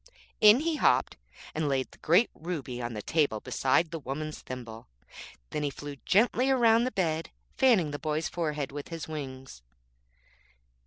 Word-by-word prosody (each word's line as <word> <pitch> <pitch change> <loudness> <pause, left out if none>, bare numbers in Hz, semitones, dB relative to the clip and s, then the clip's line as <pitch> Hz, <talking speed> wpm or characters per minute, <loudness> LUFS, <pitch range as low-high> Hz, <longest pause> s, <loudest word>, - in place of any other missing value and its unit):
In 215 +5 +7
he 320 -1 0
hopped, - - +2 0.4
and 155 -1 -1
laid 135 -1 -1
the - - -18
great 180 +9 +3
ruby 145 -7 -5
on 120 -1 -4
the 105 - -5
table 145 -9 +1
beside 145 +9 +1
the 165 - -4
woman's 150 +3 -5
thimble. 115 -3 -8 0.6
Then 150 - -2
he 145 - 0
flew 145 +1 -8
gently 245 +6 +3
round 235 -2 +4
the - - -2
bed, 165 -5 -1 0.3
fanning 225 - +4
the 145 - -5
boy's 155 0 -1
forehead 150 -5 -3
with 145 0 -7
his 165 -3 -6
wings. 130 - -7
155 Hz, 160 wpm, -29 LUFS, 135-185 Hz, 0.6 s, In